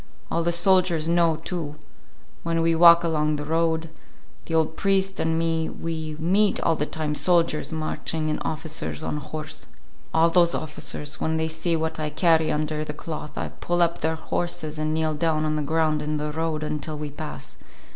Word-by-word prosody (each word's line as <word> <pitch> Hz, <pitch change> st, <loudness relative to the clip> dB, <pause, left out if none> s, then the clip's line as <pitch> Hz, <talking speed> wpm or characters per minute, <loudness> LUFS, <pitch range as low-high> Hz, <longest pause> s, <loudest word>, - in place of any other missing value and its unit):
All 170 Hz, -, +1 dB
the 170 Hz, +1 st, +1 dB
soldiers 175 Hz, -2 st, +3 dB
know, 170 Hz, -1 st, +3 dB
too. 160 Hz, -2 st, -5 dB, 0.7 s
When 165 Hz, 0 st, 0 dB
we 165 Hz, 0 st, +3 dB
walk 170 Hz, +1 st, +8 dB
along 155 Hz, -2 st, +1 dB
the 150 Hz, 0 st, -4 dB
road, 160 Hz, +1 st, 0 dB, 0.6 s
the 165 Hz, -, -2 dB
old 160 Hz, 0 st, +2 dB
priest 195 Hz, -1 st, +1 dB
and 160 Hz, 0 st, +1 dB
me, 165 Hz, -1 st, 0 dB
we 160 Hz, -2 st, -4 dB
meet 195 Hz, +6 st, +2 dB
all 165 Hz, -, +2 dB
the 150 Hz, -1 st, -2 dB
time 155 Hz, -2 st, -2 dB
soldiers 165 Hz, -1 st, +1 dB
marching 155 Hz, 0 st, -2 dB
and 155 Hz, -, -1 dB
officers 160 Hz, 0 st, -3 dB
on 150 Hz, -, -2 dB
horse. 155 Hz, +1 st, -7 dB, 0.4 s
All 165 Hz, +1 st, +4 dB
those 170 Hz, -1 st, +4 dB
officers, 150 Hz, -1 st, -4 dB
when 160 Hz, 0 st, 0 dB
they 160 Hz, 0 st, 0 dB
see 165 Hz, +1 st, -1 dB
what 160 Hz, 0 st, -2 dB
I 155 Hz, -1 st, -1 dB
carry 160 Hz, 0 st, +3 dB
under 150 Hz, 0 st, -1 dB
the 150 Hz, -, -5 dB
cloth, 150 Hz, -1 st, -7 dB, 0.2 s
pull 175 Hz, 0 st, +2 dB
up 170 Hz, 0 st, 0 dB
their 160 Hz, 0 st, +1 dB
horses 160 Hz, -1 st, -3 dB
and 155 Hz, 0 st, 0 dB
kneel 155 Hz, 0 st, 0 dB
down 155 Hz, 0 st, +1 dB
on 155 Hz, 0 st, 0 dB
the 155 Hz, -, 0 dB
ground 155 Hz, 0 st, +1 dB
in 150 Hz, 0 st, -2 dB
the 150 Hz, 0 st, -2 dB
road 160 Hz, 0 st, -2 dB
until 150 Hz, 0 st, -3 dB
we 150 Hz, -1 st, -5 dB
pass. 150 Hz, +1 st, -8 dB
160 Hz, 185 wpm, -25 LUFS, 155-165 Hz, 0.7 s, walk